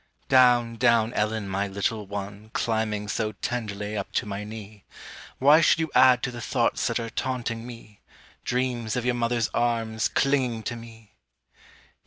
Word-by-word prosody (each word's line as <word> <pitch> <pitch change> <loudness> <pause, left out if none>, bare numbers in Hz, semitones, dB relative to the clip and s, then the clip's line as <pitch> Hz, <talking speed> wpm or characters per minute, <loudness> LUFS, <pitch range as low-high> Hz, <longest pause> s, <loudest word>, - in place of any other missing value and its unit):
Down, 120 -3 +4
down, 115 -1 +3
Ellen, 105 -1 -1
my 100 +1 -1
little 100 +2 -2
one, 100 +1 -7
Climbing 110 -2 -1
so 105 +1 -2
tenderly 105 -2 -4
up 100 -2 -4
to - - 0
my 100 0 -5
knee; 105 -1 -10 0.5
Why 145 +5 +6
should 165 - +4
you 160 -1 -2
add 125 -1 +6
to 125 - -1
the 120 -1 -8
thoughts 120 0 0
that 115 0 -1
are 115 -1 -5
taunting 120 -3 -3
me, 115 -4 -12 0.4
Dreams 125 -2 -1
of 125 -1 -2
your 125 - +2
mother's 120 -1 0
arms 115 -2 0
clinging 130 -5 0
to 120 - -3
me? 115 -2 -13
115 Hz, 160 wpm, -26 LUFS, 105-120 Hz, 0.5 s, Why